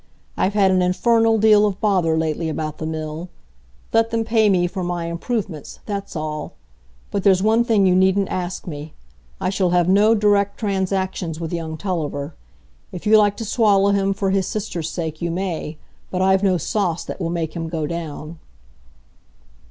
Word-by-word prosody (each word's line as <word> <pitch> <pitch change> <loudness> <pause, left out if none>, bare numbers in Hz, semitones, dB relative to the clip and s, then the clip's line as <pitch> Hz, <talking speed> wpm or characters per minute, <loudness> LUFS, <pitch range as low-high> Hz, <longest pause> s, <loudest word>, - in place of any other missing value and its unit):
"I've 200 +2 0
had 195 -2 +4
an 185 -1 +3
infernal 225 +5 +3
deal 215 -1 +5
of 195 -2 -4
bother 180 -6 +2
lately 160 +1 -1
about 155 -1 -4
the 155 - -3
mill. 160 +2 -5 0.6
Let 225 0 +3
them 230 0 0
pay 220 -1 +3
me 180 -3 +3
for 185 +1 -4
my 175 -1 -2
improvements, 170 - -4
that's 200 -2 -5
all. 155 -1 -4 0.6
But 200 - -1
there's 190 -1 +4
one 225 +2 +4
thing 220 -4 +3
you 185 - +4
needn't 190 +1 +3
ask 180 0 -4
me. 150 -2 -7 0.4
I 185 - -1
shall 190 -2 +1
have 175 -1 +2
no 205 +4 +5
direct 205 -1 +2
transactions 190 -5 -2
with 165 0 -5
young 160 -2 -4
Tulliver. 155 -5 -3 0.6
If 180 - -8
you 215 +1 +6
like 205 -1 +2
to 225 - -4
swallow 200 -3 +3
him 195 -1 +1
for 195 -1 0
his 195 -2 +1
sister's 180 -6 -3
sake, 160 -2 -5
you 170 - -1
may; 170 -3 -3 0.3
but 185 - -3
I've 190 0 +3
no 190 -3 +2
sauce 175 0 -1
that - - -7
will 165 - -1
make 165 -1 -3
him 165 -1 -4
go 160 -2 -2
down." 160 0 -6
185 Hz, 180 wpm, -21 LUFS, 165-200 Hz, 0.6 s, you